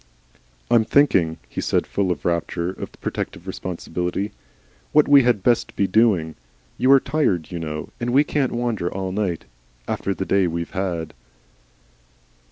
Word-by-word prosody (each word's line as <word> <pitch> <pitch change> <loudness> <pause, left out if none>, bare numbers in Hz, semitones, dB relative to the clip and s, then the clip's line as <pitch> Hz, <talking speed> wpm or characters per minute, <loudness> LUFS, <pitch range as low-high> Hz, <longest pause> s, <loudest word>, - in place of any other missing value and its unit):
"I'm 115 -2 +5
thinking," 95 - +3
he - - -5
said, - - +1
full 100 -2 -1
of 75 -5 -4
a - - +2
rapture 85 +1 -1
of - - -8
protective 85 - -4
responsibility, 90 +1 -3 0.6
"what 150 - +5
we 145 -1 +8
had 120 -6 +1
best 120 0 +1
be 100 - +2
doing. 95 -5 +2 0.5
You 130 - +4
are 135 - +7
tired, 125 - 0
you 85 - -4
know. 75 -1 -5
And 120 - -2
we 135 +4 +5
can't 145 -3 0
wander 120 -7 -1
all 95 -1 -3
night 95 -4 -2 0.4
after 100 - -2
the 95 - -3
day 95 -1 +2
we've 85 0 -4
had." 90 -4 -3
95 Hz, 160 wpm, -22 LUFS, 85-120 Hz, 0.6 s, we